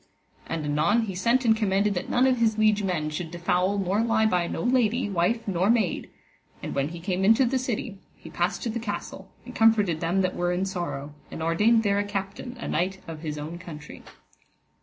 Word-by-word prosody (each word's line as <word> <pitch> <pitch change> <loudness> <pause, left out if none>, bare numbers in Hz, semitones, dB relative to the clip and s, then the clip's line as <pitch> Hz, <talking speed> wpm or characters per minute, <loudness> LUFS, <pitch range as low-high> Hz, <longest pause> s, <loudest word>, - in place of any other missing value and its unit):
And 160 -2 -3
anon 155 +10 +2
he 200 -3 -4
sent 235 +7 +1
and 220 -1 +5
commanded 205 -1 +1
that 180 - -4
none 250 +1 +3
of 260 -1 +3
his 220 -2 +2
liege 215 -1 +3
men 170 -6 -1
should 160 +2 -4
defoul 180 +3 0
nor 195 +2 +1
lie 225 -1 +2
by 180 -5 +1
no - - -4
lady, 245 -1 +2
wife 195 +6 0
nor 185 +1 +1
maid; 220 -7 +1 0.5
and - - -4
when 140 0 0
he 170 +1 -8
came 185 +1 -2
into 225 +6 +5
the 260 +2 0
city, 235 -5 -4 0.2
he - - -13
passed - - -1
to 235 - -1
the 235 - -3
castle, 215 -2 -6 0.2
and - - -9
comforted 210 -7 +3
them 175 +4 +1
that 185 -1 -1
were 175 0 0
in 185 +2 0
sorrow, 170 -6 -4 0.2
and 160 - -6
ordained 215 +8 +3
there 200 -1 +2
a - - +1
captain, 205 +5 -5
a 235 - -6
knight 185 +4 -1
of 165 -2 -7
his 150 -1 -5
own 155 +4 -6
country. 150 -4 -10
195 Hz, 210 wpm, -26 LUFS, 175-225 Hz, 0.5 s, and